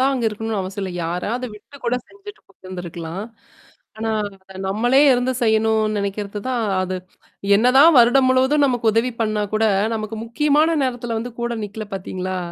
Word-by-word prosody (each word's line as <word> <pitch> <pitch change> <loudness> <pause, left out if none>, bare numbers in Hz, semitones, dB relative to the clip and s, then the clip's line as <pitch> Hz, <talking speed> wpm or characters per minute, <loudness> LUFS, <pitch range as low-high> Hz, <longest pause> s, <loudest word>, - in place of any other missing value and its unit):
தான் 270 +1 +3
அங்க 245 - -2
இருக்கணும்னு 220 0 -3
அவசியம் 190 +1 -5
இல்ல. 190 - -3
யாராவத 205 +9 -2
விட்டு 230 +7 -15
கூட 240 +1 +1
செஞ்சுட்டு 410 +1 -12
போயிருந்துருக்கலாம். 180 -1 -7 0.7
ஆனா 225 0 -2 0.3
அத 190 0 -13
நம்மளே 240 +7 +3
இருந்து 250 +1 +1
செய்யணும்னு 220 -1 +2
நினைக்கிறது 200 +1 -3
தான் 245 -3 0 0.2
அது 185 0 -3 0.6
என்னதான் 260 +8 +6
வருடம் 245 +3 +5
முழுவதும் 265 +3 +3
நமக்கு 245 -4 +1
உதவி 225 +3 +1
பண்ணா 215 -1 0
கூட 220 +1 +2 0.3
நமக்கு 215 0 -4
முக்கியமான 300 +7 +2
நேரத்தில 245 -3 -2
வந்து 240 +2 -6
கூட 240 0 -1
நிக்கல 210 +1 -7
பார்த்தீங்களா? 185 -1 -4
225 Hz, 155 wpm, -21 LUFS, 200-255 Hz, 0.7 s, என்னதான்